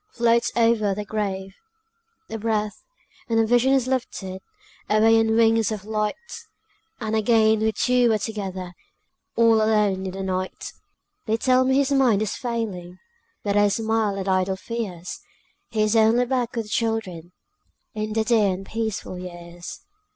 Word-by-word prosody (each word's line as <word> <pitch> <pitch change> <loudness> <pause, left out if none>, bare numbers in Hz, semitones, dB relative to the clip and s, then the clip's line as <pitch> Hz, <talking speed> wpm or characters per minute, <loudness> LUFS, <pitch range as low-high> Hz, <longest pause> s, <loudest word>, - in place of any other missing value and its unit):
floats 235 - +2
over 225 -4 +2
their 210 +1 -5
grave. 195 -2 -3 0.8
A 225 - -4
breath, 215 -1 -2 0.5
and 225 - +1
the 225 - +4
vision 245 +3 +3
is 265 -3 +3
lifted 195 -7 -3 0.5
Away 225 +1 +5
on 220 0 +2
wings 225 -1 +3
of 205 -2 -5
light, 215 -1 -1 0.8
And 220 -2 -2
again 220 0 +3
we 220 0 +1
two 245 +1 +2
are 220 - +3
together, 190 -4 -5 0.6
All 230 -1 +5
alone 210 -3 +1
in - - -4
the 195 0 -5
night. 185 0 -4 0.5
They 220 +1 +1
tell 255 +2 +3
me 265 0 +2
his 280 0 +2
mind 250 -7 +3
is 215 - -3
failing, 205 -8 -4 0.5
But 205 -1 -1
I 205 0 +5
smile 220 -1 0
at 195 0 -4
idle 190 0 +1
fears; 190 -6 -5 0.5
He 215 -1 0
is 215 +1 +1
only 225 +3 +4
back 245 -1 -1
with 230 -2 -2
the - - -13
children, 205 -7 -2 0.6
In 215 -1 -3
the 220 0 +1
dear 220 -3 +3
and 195 +1 -9
peaceful 220 -4 -4
years. 175 -1 -9
220 Hz, 160 wpm, -23 LUFS, 195-230 Hz, 0.8 s, Away